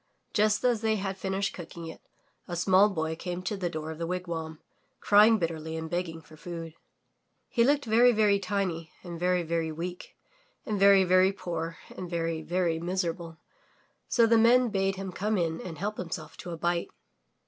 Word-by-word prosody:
Just 215 0 +2
as 240 -3 +2
they 220 -1 +2
had 195 -2 -3
finished 195 +1 -2
cooking 170 -1 -8
it, 160 - -9 0.5
a 175 - -4
small 190 +4 +4
boy 160 -4 -2
came 180 +2 -5
to 195 +3 -2
the 185 -3 -2
door 160 -1 -5
of 160 - -8
the 165 - -2
wigwam, 165 -3 -4 0.4
crying 215 +2 +6
bitterly 160 -3 -3
and 160 0 -6
begging 170 -2 -3
for 155 - -16
food. 165 0 -7 0.8
He 235 - +3
looked 285 +2 +2
very, 235 +2 +5
very 210 -3 +3
tiny 185 -4 -2
and 170 -2 -7
very, 180 0 +1
very 165 -1 -1
weak 175 +3 -7 0.5
and 210 -3 -2
very, 195 -1 +7
very 185 +1 +4
poor 165 -4 -5 0.2
and 180 - -6
very, 165 -2 -2
very 170 0 0
miserable, 170 -2 -3 0.7
so 235 - +4
the 225 0 +4
Men 240 +2 +5
bade 195 -2 0
him 195 -1 -5
come 210 +3 -1
in 165 -2 -1
and 165 -4 -7
help 210 +5 -3
himself 165 -3 -6
to 180 - -8
a 170 - -5
bite. 170 +1 -1
180 Hz, 180 wpm, -28 LUFS, 165-200 Hz, 0.8 s, very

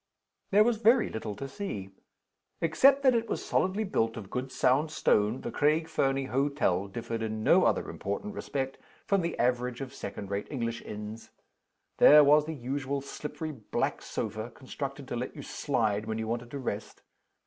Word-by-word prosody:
There 205 +2 +6
was 235 0 +2
very 230 +2 +4
little 110 -2 -4
to 135 - -6
see. 130 - -5 0.7
Except 265 - +4
that 260 -2 +6
it 230 -1 0
was - - -3
solidly 190 +4 +1
built 115 - 0
of 100 -3 -8
good 130 +1 -3
sound 135 +6 +2
stone, 110 -5 +2
the - - -4
Craig 155 +2 +2
Fernie 135 -4 0
hotel 130 -8 +1
differed 115 +2 -4
in 110 -1 -3
no - - +5
other - - +1
important 100 - -4
respect 135 -8 -4 0.3
from 200 -1 +2
the 170 -1 -3
average 125 0 0
of 135 -2 -6
second 100 0 -7
rate 100 +1 -2
English 115 -4 -3
inns. 105 +2 -8 0.7
There 150 +1 +9
was 150 +1 +5
the 160 0 -4
usual 135 +1 -3
slippery 150 +3 -6
black 115 -8 -2
sofa 110 +1 -4
constructed 135 +3 -7
to 120 - -4
let 125 +2 -4
you - - -7
slide 110 -6 -1
when 110 0 -2
you 110 0 -3
wanted 120 +1 -3
to 140 - -5
rest. 110 -5 -5
130 Hz, 175 wpm, -29 LUFS, 110-150 Hz, 0.7 s, There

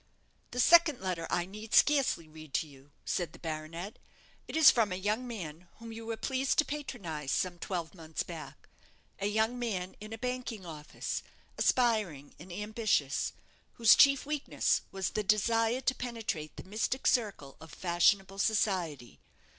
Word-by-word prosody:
"The 250 - -5
second 330 0 +6
letter 180 -3 -3
I 175 - 0
need 215 +4 -5
scarcely 275 - +4
read 155 -2 -10
to 160 - +1
you," 140 -1 -17 0.2
said 175 -4 -2
the - - -12
baronet; 165 +5 -6 0.5
"it - - -3
is 320 - +9
from 225 -5 +1
a - - -1
young 210 +6 -1
man 175 -7 -7
whom 230 0 -10
you 225 0 -8
were 225 -1 -3
pleased 265 +2 0
to 305 - +5
patronize 190 - -5
some 175 +4 0
twelve 170 -3 -4
months 160 -3 -5
back - - -9 0.5
a 200 - 0
young 220 +4 +1
man 190 -6 -3
in 215 +1 -9
a 225 - -5
banking 250 -4 -4
office, 150 -3 -5 0.3
aspiring 215 - +1
and 175 +4 -11
ambitious, 210 - 0 0.4
whose 230 -2 +7
chief 275 -1 +6
weakness 295 -1 0
was 190 -1 -2
the 215 - -1
desire 225 +4 +2
to 260 - +1
penetrate 225 -12 -4
the - - -7
mystic 220 +7 -2
circle 200 - 0
of 160 - -11
fashionable 190 +2 +2
society. 185 - 0
205 Hz, 160 wpm, -31 LUFS, 170-235 Hz, 0.5 s, is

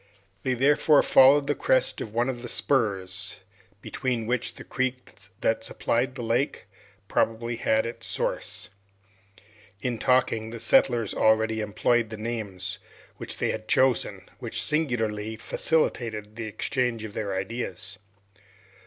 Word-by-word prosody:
They 130 +3 0
therefore 145 +3 +4
followed 140 +2 +6
the 145 - +1
crest 130 - +1
of 110 - -5
one 120 +3 +1
of 125 -2 -3
the 120 - -6
spurs, 100 -11 0 0.5
between 125 -4 -2
which 125 +1 -1
the - - -9
creek 130 -1 -3 0.3
that 115 0 +1
supplied 120 +3 -1
the 125 - -5
lake 120 0 0 0.4
probably 115 +2 0
had 110 -1 +2
its 115 -1 -2
source. - - -2 1.1
In 120 +2 -2
talking, 125 -4 +2
the 115 0 -7
settlers 115 -1 +3
already 110 0 +3
employed 110 +2 +1
the 110 - -6
names 100 -4 -4 0.4
which - - -6
they - - 0
had 110 - -6
just - - +3
chosen, 130 -2 +1
which - - -3
singularly 110 -8 -1
facilitated 110 -6 0
the 115 -1 -5
exchange 115 +2 -1
of 110 -2 -7
their 100 -3 -3
ideas. 95 -2 -4
115 Hz, 135 wpm, -26 LUFS, 110-125 Hz, 1.1 s, followed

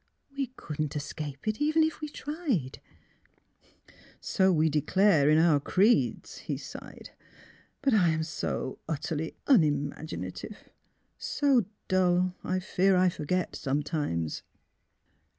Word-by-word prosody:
We 275 -1 -1
couldn't 150 - -4
escape 145 +1 -6
it 215 +5 -1
even 310 +2 +3
if 315 0 -2
we 305 - -4
tried! 290 - -3 0.4
" - - -39 0.2
'' - - -25 0.3
So 190 0 +2
we 160 -2 +3
declare 155 +1 +3
in 155 - +5
our 160 -3 +5
creeds," 195 - +1
he - - -4
sighed; - - -10 0.4
" - - -29
but 275 -3 +3
I 185 -6 +4
am 160 0 0
so 145 -4 -4
utterly 160 +1 -3
unimaginative 145 - 0 0.3
— - - -45
so 270 -7 +2 0.2
dull, 185 -1 +2
I 185 - -1
fear 190 0 +2
I 185 0 +4
forget 180 +1 -2
sometimes." 140 - -2
170 Hz, 130 wpm, -29 LUFS, 150-210 Hz, 0.4 s, in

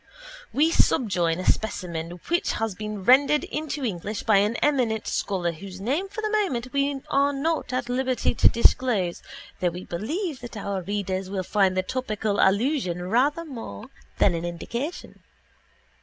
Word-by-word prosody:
We 315 +4 +3
subjoin 185 - +2
a 185 - -4
specimen 170 -6 -1 0.2
which 345 +1 +1
has 225 -2 -1
been 210 0 -6
rendered 280 +6 +5
into 300 -2 -3
English 205 0 -3
by 215 -3 +4
an 205 +3 +2
eminent 245 -7 +1
scholar 180 -4 -1
whose 185 +3 -9
name 285 - -1
for 420 +2 -5
the 430 -1 -1
moment 280 - 0
we 280 0 +1
are 280 +1 +3
not 305 +3 -1
at 255 -1 -1
liberty 255 0 0
to - - +5
disclose 225 -7 +3 0.4
though 180 - +2
we 180 +2 -7
believe 295 - -3
that 240 -2 -8
our 200 -2 -3
readers 190 -1 -3
will 190 -1 -2
find 190 -1 +2
the 185 - +2
topical 215 -3 -2
allusion 190 - +1
rather 290 +8 +2
more 225 - -8 0.3
than - - +4
an 165 0 -3
indication. 235 - -5
225 Hz, 155 wpm, -25 LUFS, 190-275 Hz, 0.4 s, rendered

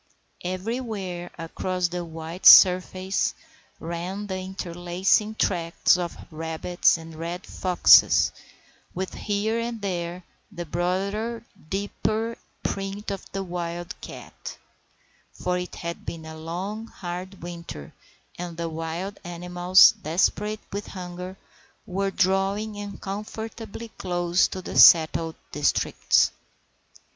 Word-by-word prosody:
Everywhere 185 -2 -4
across 180 +2 -2
the 175 0 -3
white 165 +2 -2
surface 185 +1 +6 0.4
ran 175 +5 -4
the 190 -2 -3
interlacing 185 +3 0
tracks 170 -6 +2
of 175 -1 -3
rabbits 160 +3 +1
and 165 0 -10
red 170 +3 -5
foxes, 180 -2 +5 0.6
with 185 +1 -3
here 215 +2 -1
and 230 0 -3
there 180 -2 -3 0.3
the 175 -3 -6
broader, 200 +7 -2 0.3
deeper 215 +4 -1 0.3
print 195 +1 -3
of 195 - -7
the 195 0 -3
wild 175 -1 -4
cat; - - -9 0.8
for 180 0 -1
it 180 - -6
had 170 -1 -6
been 160 -1 -7
a 160 0 -8
long, 185 +8 -5
hard 180 -1 -7
winter, 170 - -8 0.5
and 175 -2 -5
the 170 -1 -2
wild 165 +5 -4
animals, 180 +1 +5
desperate 205 +6 0
with 205 +1 -4
hunger, 180 0 -7 0.5
were 195 +2 -1
drawing 195 +3 +1
uncomfortably 210 +3 -6
close 175 0 +2
to 185 - -7
the - - -1
settled 160 0 +7 0.2
districts. 145 -1 +2
180 Hz, 110 wpm, -25 LUFS, 170-200 Hz, 0.8 s, settled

